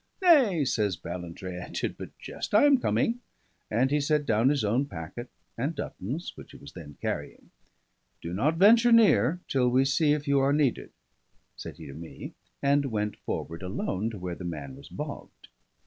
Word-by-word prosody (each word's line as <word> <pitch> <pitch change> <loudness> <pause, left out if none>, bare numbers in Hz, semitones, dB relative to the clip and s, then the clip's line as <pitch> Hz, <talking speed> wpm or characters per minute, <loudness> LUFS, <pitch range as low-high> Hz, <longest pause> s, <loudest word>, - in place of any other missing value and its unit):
"Nay," 265 - +5
says 105 -6 0
Ballantrae, 90 +2 -7
"I - - -8
did - - -3
but - - -10
jest. - - -5
I 210 - +7
am 285 -3 +6
coming." 235 -1 0 0.5
And 125 +5 +1
he 150 0 +2
set 150 0 +1
down 115 +1 +3
his 140 -4 +1
own 120 +7 +1
packet 90 - -7 0.3
and 140 +8 -2
Dutton's, 135 - -5
which - - -13
he - - -11
was 70 - -12
then 75 -5 -11
carrying. - - -5 0.7
"Do 85 - -6
not 140 - +1
venture 230 +6 +6
near 180 - +5
till 125 -2 +2
we 130 +2 +3
see 145 +2 +3
if 150 0 -3
you 140 0 +3
are 135 +1 +3
needed," 145 -4 +1 0.7
said - - -9
he - - -10
to 70 - -9
me, 80 +3 -9 0.3
and 140 0 +3
went 105 -4 -2
forward 85 +1 -5
alone 95 +3 -2
to 110 - -7
where 90 -1 -5
the 90 - -8
man 75 -6 -6
was 70 +1 -13
bogged. - - -8
125 Hz, 185 wpm, -28 LUFS, 90-150 Hz, 0.7 s, I